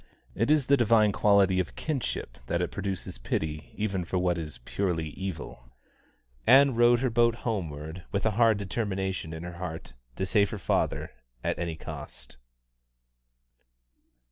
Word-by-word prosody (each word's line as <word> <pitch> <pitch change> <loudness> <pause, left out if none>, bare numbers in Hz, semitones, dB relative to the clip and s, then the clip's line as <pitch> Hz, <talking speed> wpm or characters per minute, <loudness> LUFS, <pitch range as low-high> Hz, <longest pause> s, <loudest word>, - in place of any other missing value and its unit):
It 115 - 0
is 150 -3 +4
the 140 - +5
divine 110 -3 +4
quality 100 -2 +4
of 90 - -2
kinship 135 - -3
that 85 - 0
it 90 - -1
produces 95 -9 -3
pity 75 +4 -3
even 100 -4 -1
for 90 +2 -2
what 90 -1 +2
is 80 -3 -6
purely 85 -5 -1
evil. 80 -9 -7 0.8
Ann 135 +2 +7
rowed 120 +1 +5
her 130 -2 +1
boat 120 0 +3
homeward 85 -7 -4
with 100 - -1
a 110 - +3
hard 110 0 +4
determination 95 -4 -2
in 80 +1 -6
her 90 0 -7
heart 80 -8 -6 0.2
to 95 - -1
save 100 +1 +3
her 110 - -5
father 95 - -1 0.3
at - - -1
any 85 -2 -2
cost. 80 - -9
95 Hz, 150 wpm, -28 LUFS, 85-115 Hz, 0.8 s, Ann